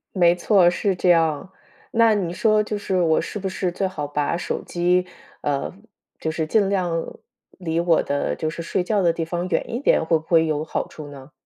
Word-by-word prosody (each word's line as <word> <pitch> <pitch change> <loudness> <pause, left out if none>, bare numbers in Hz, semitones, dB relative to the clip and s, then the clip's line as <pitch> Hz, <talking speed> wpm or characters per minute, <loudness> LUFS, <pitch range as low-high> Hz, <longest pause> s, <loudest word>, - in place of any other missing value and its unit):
没 175 -2 +4
错， 180 0 +4
是 190 +2 0
这 180 +1 +1
样。 165 +1 +2 0.4
那 230 -1 +4
你 180 -4 -2
说 215 +2 +3
就 210 0 -3
是 190 -2 -1
我 160 -2 +3
是 - - -6
不 195 - -3
是 185 -1 -2
最 190 +2 -1
好 150 -6 -5
把 145 +1 -1
手 - - -3
机， 180 +1 +1 0.4
呃， 145 +3 -2 0.5
就 160 - -2
是 160 0 -2
尽 200 +3 +2
量 185 -3 0 0.7
离 165 -2 -1
我 170 -1 +3
的 140 0 -1
就 155 - -2
是 170 +1 -6
睡 180 +2 -1
觉 205 +2 +1
的 170 -2 +3
地 165 - -3
方 175 +2 -3
远 - - 0
一 235 - -1
点， 275 - +3
会 160 0 +2
不 155 - -12
会 165 -1 +4
有 155 -1 -1
好 160 - -3
处 155 -2 -10
呢？ 140 0 -12
175 Hz, 230 characters per minute, -22 LUFS, 160-190 Hz, 0.7 s, 没